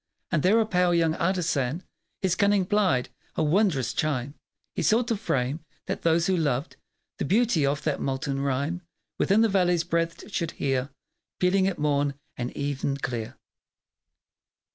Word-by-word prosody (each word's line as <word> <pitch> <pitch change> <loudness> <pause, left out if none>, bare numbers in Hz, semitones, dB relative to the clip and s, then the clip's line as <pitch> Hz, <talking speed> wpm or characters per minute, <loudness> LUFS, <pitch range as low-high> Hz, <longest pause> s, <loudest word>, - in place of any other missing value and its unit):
And 165 -4 +2
there 205 +7 +4
a 225 - +3
pale 180 -4 +2
young 165 -2 +3
artisan 165 -4 0 0.4
His 185 -2 +2
cunning 200 0 +3
plied; 185 -11 +2 0.3
a - - +1
wondrous 150 - +2
chime 140 -2 -1 0.4
He - - -2
sought 230 +2 +3
to 230 - +2
frame, 140 - -1 0.3
that - - -3
those 165 0 +3
who 190 - +2
loved 145 -3 -1 0.4
The - - 0
beauty 210 - +2
of 140 +1 -1
that 150 -3 -1
molten 135 +1 -2
rhyme 140 +6 -1 0.4
Within 205 +3 +4
the 225 - +5
valley's 180 -4 +2
breadth 170 +3 -2
should 170 -5 -2
hear 135 -1 -1 0.5
Pealing 190 +1 +3
at 195 - -1
morn 145 -1 +1 0.2
and 120 0 -3
even 140 -1 -1
clear. 120 -5 -4
165 Hz, 155 wpm, -26 LUFS, 140-185 Hz, 0.5 s, the